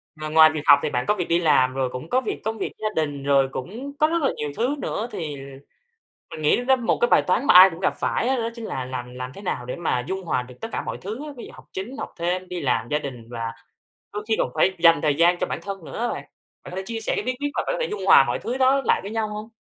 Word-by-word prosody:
Ng 155 0 -6
ngoài 160 0 +8
việc 155 - -3
học 145 -1 +8
thì - - 0
bạn 125 -1 -1
có 210 - +4
việc 180 -4 -3
đi 170 +1 +3
làm, 130 -6 +3
rồi 130 -1 -1
cũng 125 +5 -7
có 255 +1 +2
việc - - -4
công 220 +1 -2
việc - - -3
gia 215 - -1
đình, 145 -3 -2
rồi 140 -1 +3
cũng 230 - -6
có 310 - +5
rất 335 0 0
là 275 - +2
nhiều 150 -1 -3
thứ 250 +5 0
nữa, 230 -3 -3
thì 155 -7 -4 1.0
mình 155 - -7
nghĩ 150 - +3
đó 265 +1 +5
một 240 -3 0
cái 240 - +5
bài - - +5
toán 205 +9 0
mà - - +5
ai 185 +2 +10
cũng 165 - -9
gặp 190 - +1
phải - - 0
á 265 - +2
đó 230 0 -1
chính 230 -2 -7
là 130 -10 -4
làm 125 -1 -6
làm 125 0 -6
thế 200 - -10
nào 125 -10 -3
để 125 - -4
mà 160 -8 -1
dung 190 0 -3
hòa 140 -7 -1
được 125 0 -13
tất 225 - -3
cả - - -2
mọi - - -5
thứ 220 +10 -6
á, 300 - -7
ví - - -8
dụ - - -12
học - - -14
chính, 225 +9 -6
học - - -5
thêm, 180 +2 -1
đi 180 -2 -5
làm, 120 -4 0
gia 150 - +1
đình 125 -5 -8
và 115 -1 -4 0.6
đôi 210 0 -5
khi 220 - +3
còn - - 0
phải 190 - +3
dành 165 -1 +6
thời 150 -2 +2
gian 170 +3 +4
cho - - -1
bản - - -4
thân 195 -4 -6
nữa - - -8
á 240 +1 0
bạn. - - -4 0.4
Bạn - - -10
có 180 - -8
thể 190 - -2
chia 230 -1 -4
sẻ 225 - -2
cái - - -1
bí 255 0 -2
quyết 290 - 0
mà - - 0
bạn - - 0
có - - -3
thể 485 - +1
dung 425 - -4
hòa - - +8
mọi - - -2
thứ 250 +3 -4
đó 265 +1 +4
lại - - +3
với 200 - -6
nhau 220 -1 -1
hông? 210 +1 -7
180 Hz, 310 wpm, -23 LUFS, 140-225 Hz, 1.0 s, ai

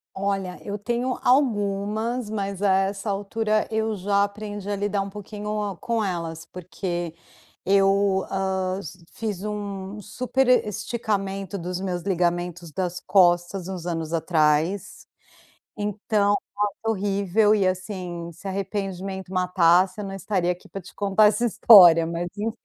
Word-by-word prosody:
Olha, 195 -2 -2
eu 205 0 -4
tenho 240 +4 -2
algumas, 220 -2 +1
mas 200 -2 -3
a 200 -2 +3
essa 195 +2 0
altura 215 +2 0
eu 220 -1 -1
já 200 +1 +1
aprendi 205 0 -5
a 205 - 0
lidar 200 0 -1
pouquinho 210 -1 -4
com 230 -2 -1
elas, 165 -3 -3
porque 175 -2 -5 0.5
eu, 195 0 +3
hã, 190 -1 -1
s 185 -3 -10
fiz 210 -4 -4
um 205 -1 -5
superesticamento 210 -4 -1
dos 180 +1 -4
meus 180 -2 -3
ligamentos 175 -2 -1
das 180 +1 -3
costas 175 0 +2
uns 180 -3 -6
anos 165 -2 -3
atrás, 160 +2 +1 0.7
então, 205 0 0 0.3
ai 205 - +3
foi 225 0 +1
horrível. 200 +1 +2
E, 195 -3 +2
assim, 180 -2 -4
se 185 +4 -9
arrependimento 190 -1 -4
matasse 180 +1 +3
eu - - -4
não 195 0 -6
estaria 190 -2 -1
aqui 180 - -5
pra 195 - -7
te 185 - -14
contar 205 +1 +3
essa 210 +3 +2
história, 175 -8 +8
mas 170 +1 -3
enfim, 225 +3 -3
195 Hz, 135 wpm, -24 LUFS, 180-210 Hz, 0.7 s, história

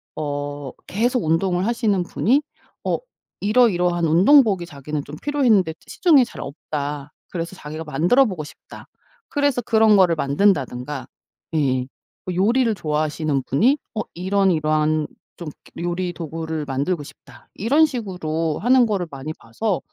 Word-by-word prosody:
어 145 -2 -4 0.2
계속 240 +5 0
운동을 175 +3 +1
하시는 215 -5 +1
분이 250 +10 +1 0.4
어 - - +1 0.4
이러이러한 180 -6 +3
운동복이 195 - +5
자기는 150 -2 -5
좀 145 - -8
필요했는데 235 - +2
시중에 310 -8 +4
잘 - - -10
없다 145 0 -5 0.2
그래서 170 +1 -5
자기가 155 -1 -7
만들어보고 175 - +2
싶다 - - -13 0.4
그래서 285 -4 +1
그런 220 -1 +4
거를 180 -3 +4
만든다든가. 140 -4 0 0.5
예예 130 -4 +1 0.4
뭐 180 -1 -3
요리를 230 +4 +2
좋아하시는 150 -3 -1
분이 245 - +3 0.2
어 215 - 0
이런 190 +2 +1
이러한 155 -1 +1 0.3
좀 170 - -7 0.3
요리 175 +1 -2
도구를 160 -1 -4
만들고 145 +4 -1
싶다. 135 -3 -16
이런 285 +10 +4
식으로 170 - -3
하는 245 +2 +4
거를 195 -5 -1
많이 140 +2 -6
봐서 185 - -2
175 Hz, 315 characters per minute, -22 LUFS, 150-215 Hz, 0.5 s, 운동복이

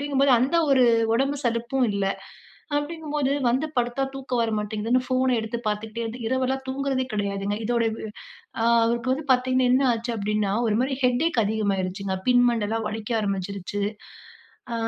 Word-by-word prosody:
அப்டிங்கும்போது, 280 -1 +2
அந்த 265 +8 +1
ஒரு 260 -2 +5 0.3
ஒடம்பு 275 +4 +1
சலுப்பும் 240 +2 0
இல்ல. 200 -1 -1 0.7
அப்டிங்கும்போது, 295 -2 -2 0.2
வந்து 260 +6 +1
படுத்தா 240 +2 0
தூக்கம் 260 -3 -2
வர 225 - 0
மாட்டேங்குதுன்னு 215 +4 0
ஃபோன 255 -1 +2
எடுத்து 220 +1 -4
பாத்துக்கிட்டே 215 +2 -2
இருந்து, 230 +2 -6
இரவெல்லாம் 260 +2 -1
தூங்குறதே 265 -1 -1
கெடையாதுங்க. 200 0 -2
இதோடைய 235 0 +1
வ் - - -7 0.6
அ - - +1 0.2
அவருக்கு 235 +2 0
வந்து 285 +3 -3
பாத்தீங்கன்னா 255 0 +2
என்ன 260 +2 +4
ஆச்சு 235 +1 -3
அப்டின்னா, 210 -1 0 0.2
ஒரு 210 - +1
மாரி 265 +1 -1
ஹெடேக் 250 0 +2
அதிகமாயிடுச்சுங்க. 195 -2 -1
பின் 245 0 +5
மண்டலாம் 225 -1 -1
வலிக்க 215 +1 -6
ஆரம்பிச்சுருச்சு. 200 0 -3 0.9
ஆ - - -1
235 Hz, 150 wpm, -25 LUFS, 210-260 Hz, 0.9 s, ஒரு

